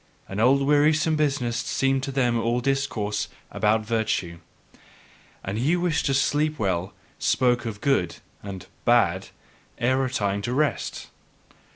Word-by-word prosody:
An 95 - -5
old 135 +4 +4
wearisome 150 +2 +3
business 135 -6 0
seemed 135 0 0
to 135 +1 -4
them 125 -3 +1
all 120 +2 0
discourse 120 -6 -1 0.2
about 110 +1 +1
virtue; 110 -6 -1 1.0
and 100 +3 -3
he 140 +8 +2
who 175 - +1
wished 165 -5 +1
to 135 - +1
sleep 150 +3 +1
well 95 -3 -1 0.3
spake 125 -1 +2
of 105 -2 -5
"good" 110 -12 +1 0.3
and 95 -3 -7 0.2
"bad" - - +3 0.5
ere 130 +2 +2
retiring 105 -7 -1
to 120 +4 -3
rest. 145 -5 -1
125 Hz, 140 wpm, -25 LUFS, 105-140 Hz, 1.0 s, old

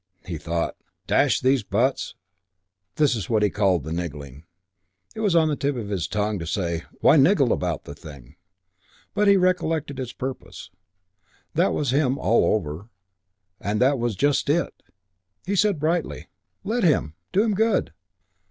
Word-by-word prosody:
He 85 -3 -5
thought, 85 +3 -2 0.3
"Dash - - +3
these 130 0 +3
buts!" 115 +7 -1 0.8
This 150 -3 +3
was 110 -7 -4
what 110 -2 +2
he 105 - +2
called 95 -7 +1
"niggling." 75 -3 -6 0.7
It - - -9
was 205 -5 +1
on 160 -1 +5
the 150 - 0
tip 140 0 -1
of 110 -5 -5
his 90 -6 -2
tongue 105 +1 -1
to 85 - -6
say, 85 -1 -2 0.2
"Why 160 - +6
niggle 140 - +4
about 85 -4 -2
the - - -9
thing?" 70 -2 -13 0.8
but 210 0 +2
he 200 0 +6
recollected 165 -6 0
his 125 -2 -4
purpose; 130 +1 -7 0.8
that - - +2
was 140 -4 -1
him 135 -1 +2
all 110 +2 +3
over 90 +1 -5 0.7
and 105 +1 -2
that 135 +2 +3
was 120 -3 -1
just 140 +7 +1
it! 170 +4 +1 0.7
He 200 - -1
said 195 -2 +2
brightly, 165 +2 -2 0.3
"Let 225 +4 -1
him. 145 - +2 0.2
Do 200 - +3
him 220 -2 +1
good. 205 - +1
125 Hz, 160 wpm, -24 LUFS, -, 0.8 s, Why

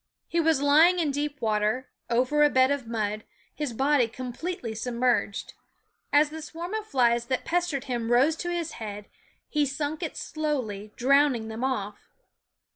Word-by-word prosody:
He 340 - 0
was 320 -4 +2
lying 315 +5 +6
in 320 -5 +1
deep 290 +1 -3
water, 220 +3 0 0.2
over 255 +5 +2
a 295 - +6
bed 260 0 +4
of 280 -4 -2
mud, 215 -2 -2 0.3
his 295 -4 -3
body 270 +1 +2
completely 250 +2 -5
submerged. 240 -2 -1 0.6
As 295 +1 +4
the 320 +1 -7
swarm 335 +5 -7
of 435 -1 -3
flies 240 - +2
that 255 0 -1
pestered 340 -6 0
him 240 -2 -3
rose 270 +6 +4
to 350 - -3
his 340 -2 -2
head 210 -1 -6 0.4
he 300 -1 +1
sunk 290 +2 -2
it - - -4
slowly, 250 -10 -3
drowning 265 -3 +3
them 220 +3 -5
off. 210 -6 -2
265 Hz, 160 wpm, -27 LUFS, 235-300 Hz, 0.6 s, lying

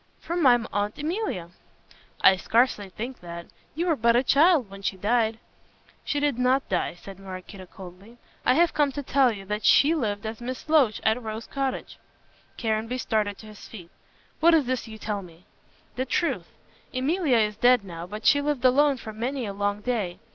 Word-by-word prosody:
"From 345 +1 -3
my 250 -5 +6 0.2
Aunt 205 +1 -1
Emilia." 300 - -3 0.7
"I 190 - +7
scarcely 220 0 +1
think 240 +7 -7
that. 170 -1 -8 0.3
You 335 +3 -1
were 335 -3 +2
but 235 -2 +3
a 245 - +3
child 295 - +4
when 195 0 -11
she 195 -1 -2
died." 220 +3 +1 0.7
"She 290 - -1
did 285 -4 0
not 255 +2 +2
die," 180 -2 -1
said 195 +1 -11
Maraquito 185 0 -9
coldly. 190 +5 -13 0.3
"I 250 - +3
have 340 0 +3
come 290 -2 +2
to 285 - -4
tell 270 -2 +3
you 195 -3 -8
that 210 +2 -3
she 300 +3 +5
lived 215 -9 -2
as 220 +1 -5
Miss 255 +4 -6
Loach 285 -9 +3
at 220 +3 +2
Rose 220 0 -6
Cottage." 270 -1 -4 0.6
Caranby 225 +1 -1
started 210 -4 -1
to - - -13
his 215 -1 -12
feet. 175 -6 -12 0.5
"What 335 +1 +6
is 305 -4 +2
this 255 -1 -2
you 220 -1 -9
tell 210 -1 -3
me?" 170 -1 -15 0.5
"The 260 - -1
truth. 335 +6 -1 0.4
Emilia 275 +1 +1
is 210 -2 +1
dead 245 0 +4
now, 170 -2 -7
but 210 +3 -8
she 285 - +5
lived 285 -3 -1
alone 280 +2 +4
for 220 -2 -8
many 245 +4 -3
a 200 - -5
long 205 +1 -2
day. 210 -7 -2
230 Hz, 190 wpm, -25 LUFS, 205-270 Hz, 0.7 s, I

